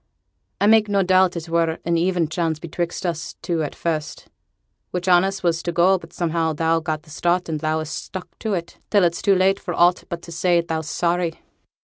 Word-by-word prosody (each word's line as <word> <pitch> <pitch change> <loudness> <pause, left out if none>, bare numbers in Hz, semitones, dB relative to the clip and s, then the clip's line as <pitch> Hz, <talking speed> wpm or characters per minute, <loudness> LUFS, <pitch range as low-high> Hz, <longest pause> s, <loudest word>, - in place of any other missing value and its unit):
'I - - +2
make 215 0 +5
no 200 -1 +2
doubt 185 0 +3
it 170 0 -5
were 165 0 +1
an 170 0 +1
even 175 -1 +1
chance 160 -1 -1
betwixt 170 +3 -4
us 165 -2 -3
two 170 -2 -1
at 150 - -4
first, 155 -3 -3 0.6
which 180 0 -4
on 175 -1 +6
us 195 0 -3
was 170 -1 +1
to 175 - -2
go; 180 +3 +4
but - - -14
somehow 165 -2 -1
thou 165 +2 +1
got 155 -1 -3
the 155 - -16
start 175 +3 0
and 155 -2 -2
thou'st 155 0 -1
stuck 185 0 -9
to 215 -3 -1
it 170 -1 -6
till 205 -3 +4
it's 170 -1 +1
too 200 -2 +4
late 190 +1 +3
for 175 -3 -4
aught 175 +1 +3
but 170 -1 -5
to 170 - -10
say 175 +1 +2
thou's 160 -2 -3
sorry.' 170 +1 0
170 Hz, 210 wpm, -22 LUFS, 165-180 Hz, 0.6 s, on